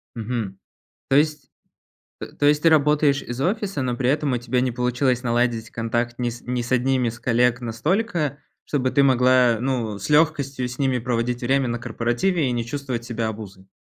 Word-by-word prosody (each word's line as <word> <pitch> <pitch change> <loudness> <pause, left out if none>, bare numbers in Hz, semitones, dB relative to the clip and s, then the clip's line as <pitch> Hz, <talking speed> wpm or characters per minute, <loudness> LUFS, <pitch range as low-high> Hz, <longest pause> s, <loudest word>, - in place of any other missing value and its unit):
Мгм, 110 -4 -4 0.5
то 135 - +2
есть, 150 -2 +1 0.7
э, - - -5
то 145 - -2
есть 150 0 +3
ты 165 - +6
работаешь 150 -2 +3
из 120 +2 -6
офиса, 195 -1 -1
но 125 -2 -1
при 125 0 0
этом 145 -1 0
у 125 - 0
тебя 120 +1 -1
не 125 -1 0
получилось 125 +1 0
наладить 120 -1 0
контакт 120 +1 -2
ни 120 -1 -1
с 120 +1 -9
ни 125 0 -2
с 120 - -5
одними 130 0 +2
из 115 +1 -7
коллег 125 0 +2
настолько, 150 - -1 0.2
чтобы 130 -3 -1
ты 140 - +3
могла, 125 -2 +4
ну, 120 -5 -2
с 100 - -6
легкостью 145 -4 +2
с 125 - -8
ними 130 -2 +1
проводить 120 0 -2
время 135 +1 +1
на 120 0 -2
корпоративе 130 +8 0
и - - -1
не 120 -1 -2
чувствовать 130 -1 -4
себя 115 -2 -3
обузой? 100 -3 -9
125 Hz, 190 wpm, -23 LUFS, 120-140 Hz, 0.7 s, ты